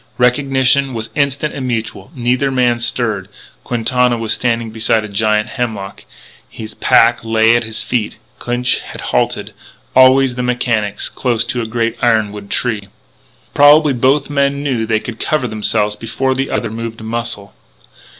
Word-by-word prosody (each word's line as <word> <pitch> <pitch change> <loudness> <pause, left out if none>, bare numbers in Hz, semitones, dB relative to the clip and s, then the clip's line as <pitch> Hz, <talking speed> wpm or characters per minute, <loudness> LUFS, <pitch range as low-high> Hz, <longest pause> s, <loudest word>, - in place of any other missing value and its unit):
Recognition 130 +1 +2
was 110 0 -5
instant 140 +1 -1
and 130 -2 -4
mutual. 115 +1 -4
Neither 125 +2 0
man 125 -2 +1
stirred. 110 -5 -1 0.3
Quintana 125 +1 +1
was 115 -1 0
standing 115 -2 -1
beside 110 0 +1
a - - -6
giant 105 +1 0
hemlock. 110 -6 -5 0.4
His 110 -1 -9
pack 120 +1 +3
lay 115 0 +3
at 120 - +1
his 110 0 -3
feet. 115 -4 -2 0.2
Clinch 120 +1 0
had - - -10
halted - - -1 0.4
always 130 0 +6
the 125 - -4
mechanics! 120 -4 -1
close 120 -3 -1
to 120 0 -2
a 115 - -4
great 115 +1 -1
ironwood 105 -4 0
tree. 110 -5 -1 0.7
Probably 145 0 +6
both 135 +3 +2
men 140 0 0
knew 135 -5 -1
that 110 0 -3
they 110 -1 +2
could 115 0 -8
cover 150 -5 0
themselves 105 -1 0
before 130 +5 -2
the 135 +1 -2
other 115 -3 -2
moved 115 0 -6
a - - -9
muscle. 110 -3 -4
120 Hz, 160 wpm, -16 LUFS, 110-130 Hz, 0.7 s, always